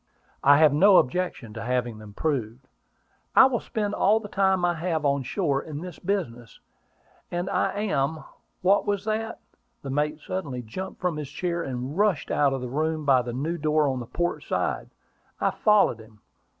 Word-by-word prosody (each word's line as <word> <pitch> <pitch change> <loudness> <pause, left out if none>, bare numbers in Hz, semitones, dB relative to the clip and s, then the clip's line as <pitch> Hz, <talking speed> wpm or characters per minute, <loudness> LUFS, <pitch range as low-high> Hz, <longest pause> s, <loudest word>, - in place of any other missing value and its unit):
"I 140 +1 +7
have 155 -2 +5
no 190 +6 +6
objection 130 -6 0
to 115 - -6
having 120 -2 -2
them 105 -1 -12
proved." 130 -4 -2 0.7
"I - - +9
will 255 -3 +1
spend 210 -2 -3
all 215 +3 +3
the 215 - -8
time 190 -2 +2
I 175 - +2
have 160 -2 -2
on 140 0 +2
shore 140 +1 -1
in 150 -1 -7
this 180 -2 -8
business; 125 - -3 0.7
and 175 +1 -3
I - - +1
am 155 -6 -1 0.4
What 195 +3 +3
was 205 -1 -1
that?" 220 +1 -2 0.4
The 135 - -5
mate 150 +2 -1
suddenly 145 -9 -5
jumped 185 +13 -7
from 180 -4 -1
his 150 -3 -5
chair, 170 +3 -2
and 130 -1 -4
rushed 200 -5 +1
out 145 -2 +3
of 135 -1 -2
the 125 - -4
room 155 +3 -1
by 135 -3 +5
the 120 0 -5
new 155 +8 -3
door 155 0 +2
on 130 -2 -1
the 120 - -7
port 175 +6 -2
side. - - -2 0.5
I - - +2
followed 210 - +3
him. 110 -1 -16
155 Hz, 185 wpm, -26 LUFS, 130-185 Hz, 0.7 s, I